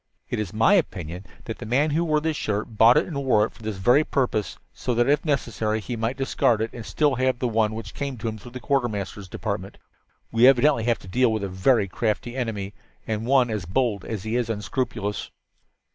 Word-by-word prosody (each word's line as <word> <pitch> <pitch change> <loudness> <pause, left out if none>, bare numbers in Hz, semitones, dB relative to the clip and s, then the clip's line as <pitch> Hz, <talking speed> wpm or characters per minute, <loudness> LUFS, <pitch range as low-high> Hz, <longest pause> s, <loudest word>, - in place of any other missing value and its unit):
It - - -1
is 105 -4 -3
my 110 - +4
opinion 90 - -1 0.2
that - - -6
the - - -6
man 140 +6 +2
who 160 +3 +1
wore 155 -2 +2
this 160 0 -1
shirt 110 -2 -3
bought 115 +5 +7
it 155 - +3
and 140 -6 -4
wore 110 -5 +4
it - - -9
for - - -18
this 110 -2 -4
very 120 +10 +4
purpose, 125 -8 -1 0.2
so 125 -2 -2
that, 120 +1 +3
if 145 +1 +3
necessary, 115 -7 -1
he 120 +3 -5
might 115 +3 -2
discard 130 -4 +1
it 110 0 -2
and 120 - -7
still 145 +5 +1
have 130 0 +1
the 125 - -1
one 110 -1 +1
which 115 - -7
came 140 -3 -4
to 115 - -4
him 110 -1 -4
through 120 +4 -12
the 130 - -6
Quartermaster's 105 -8 -2
Department. - - -4 0.5
We 115 +2 +6
evidently 135 -3 +4
have 120 -1 +2
to - - -14
deal 125 +5 +2
with 110 -2 -2
a 100 - -2
very 100 +3 +2
crafty 115 +4 -2
enemy, 105 -6 -3 0.3
and 110 +1 -3
one 130 -3 +4
as 105 -5 -3
bold 105 +1 0
as 105 -4 -5
he 110 +2 -2
is 120 -2 -1
unscrupulous. 105 -1 -3
115 Hz, 220 wpm, -24 LUFS, 105-130 Hz, 0.5 s, bought